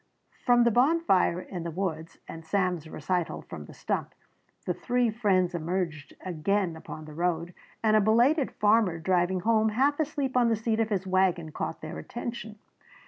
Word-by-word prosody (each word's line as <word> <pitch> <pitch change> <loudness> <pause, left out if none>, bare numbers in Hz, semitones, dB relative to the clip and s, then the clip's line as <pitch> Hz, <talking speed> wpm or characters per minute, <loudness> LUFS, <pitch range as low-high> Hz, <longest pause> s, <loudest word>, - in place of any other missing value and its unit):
From 245 -1 +6
the 235 - +4
bonfire 245 - +3
in 180 -1 -6
the 170 - -4
woods 165 -2 -4
and 165 - -8
Sam's 180 -2 -1
recital 175 +3 -2
from - - -9
the - - -13
stump, - - -3 0.5
the - - 0
three 245 -2 0
friends 190 -5 +1
emerged 165 -3 -3
again 185 +1 0
upon 155 -1 -9
the 155 - -10
road, 170 +1 -1 0.3
and 215 -1 +4
a 215 - +5
belated 245 +8 +3
farmer 210 -4 +3
driving 180 +2 +1
home 220 +1 +3
half 275 +7 +1
asleep 285 -4 -1
on 245 -2 +4
the 225 - +3
seat 220 +1 -1
of 225 -1 +1
his 195 -3 -1
wagon 185 -4 +1
caught 160 - -4
their 155 - -6
attention. 235 -2 -6
190 Hz, 170 wpm, -28 LUFS, 170-230 Hz, 0.5 s, From